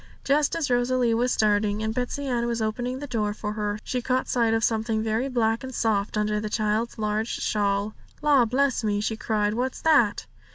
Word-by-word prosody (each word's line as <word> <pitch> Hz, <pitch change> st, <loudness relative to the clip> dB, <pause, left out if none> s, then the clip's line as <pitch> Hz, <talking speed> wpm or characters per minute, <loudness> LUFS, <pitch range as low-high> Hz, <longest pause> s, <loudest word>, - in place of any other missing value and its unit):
Just 290 Hz, +2 st, +2 dB
as 310 Hz, -6 st, -1 dB
Rosalie 245 Hz, -1 st, +2 dB
was 245 Hz, +2 st, +1 dB
starting, 210 Hz, 0 st, +1 dB
and 220 Hz, 0 st, -1 dB
Betsey 250 Hz, +4 st, -3 dB
Ann 240 Hz, -3 st, 0 dB
was 235 Hz, -1 st, -1 dB
opening 245 Hz, +4 st, -2 dB
the 290 Hz, -, -6 dB
door 215 Hz, -6 st, -2 dB
for 210 Hz, -1 st, -4 dB
her, 210 Hz, -1 st, -2 dB
she 250 Hz, -, -2 dB
caught 255 Hz, +1 st, 0 dB
sight 235 Hz, -2 st, +2 dB
of 225 Hz, 0 st, +1 dB
something 220 Hz, -1 st, 0 dB
very 225 Hz, +4 st, -1 dB
black 230 Hz, -1 st, 0 dB
and 260 Hz, -1 st, -7 dB
soft 210 Hz, -2 st, 0 dB
under 210 Hz, 0 st, 0 dB
the 210 Hz, 0 st, -4 dB
child's 215 Hz, +2 st, -1 dB
large 215 Hz, +1 st, -1 dB
shawl. 205 Hz, 0 st, 0 dB, 0.3 s
'La, 285 Hz, -5 st, +5 dB
bless 260 Hz, +1 st, +1 dB
me!' 205 Hz, -1 st, 0 dB
she 215 Hz, +2 st, -1 dB
cried; 210 Hz, -1 st, 0 dB
'what's 255 Hz, +3 st, -2 dB
that?' 280 Hz, -10 st, +3 dB
225 Hz, 200 wpm, -25 LUFS, 215-250 Hz, 0.3 s, La